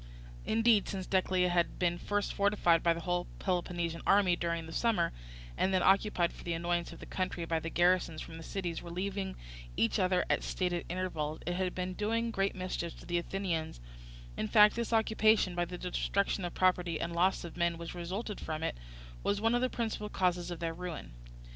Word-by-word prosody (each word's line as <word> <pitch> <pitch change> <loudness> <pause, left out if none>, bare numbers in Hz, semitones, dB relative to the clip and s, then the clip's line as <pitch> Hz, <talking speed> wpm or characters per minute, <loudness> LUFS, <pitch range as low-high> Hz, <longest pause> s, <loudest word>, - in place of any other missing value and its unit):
Indeed 225 -2 +4
since 190 -2 -3
Decelea 185 -1 +2
had 175 -1 +1
been 175 -1 +1
first 205 0 -1
fortified 200 -5 +3
by 170 - +4
the 165 - -6
whole 175 0 -1
Peloponnesian 175 -2 -1
army 195 -3 +5
during 170 -1 -2
this 160 - -4
summer, 215 -8 +2 0.4
and 190 - +1
then 185 -1 +2
occupied 190 -3 +3
for - - -12
the 170 - -2
annoyance 170 +1 -1
of - - -10
the - - -9
country 185 -2 -2
by 165 -1 0
the 165 - -4
garrisons 175 -2 +2
from 165 +1 -8
the 165 - -9
cities 175 -2 -3
relieving 190 +3 -3 0.4
each 115 - +2
other 185 -1 +2
at - - +2
stated 180 -2 -2
intervals, 165 -4 -3
it 175 - -1
had 185 0 -1
been 185 0 -2
doing 230 +4 0
great 195 -2 0
mischief 185 -2 -4
to - - -12
the 175 0 0
Athenians; 170 - -3 0.6
in 110 - -2
fact 210 - +7
this 235 0 -2
occupation, 220 -3 +3
by 175 0 0
the 180 +1 -7
destruction 190 +1 -1
of 175 - -5
property 180 -3 +2
and 170 0 -3
loss 180 +3 +2
of 170 - -8
men 170 -1 +1
which 170 0 -6
resulted 190 +5 -4
from 155 0 -4
it, - - -1 0.5
was 200 0 0
one 225 +2 +2
of 245 - +2
the 255 - +2
principal 220 -3 -3
causes 180 -3 0
of 175 -2 -5
their 165 -1 -2
ruin. 170 - -6
180 Hz, 200 wpm, -32 LUFS, 170-195 Hz, 0.6 s, fact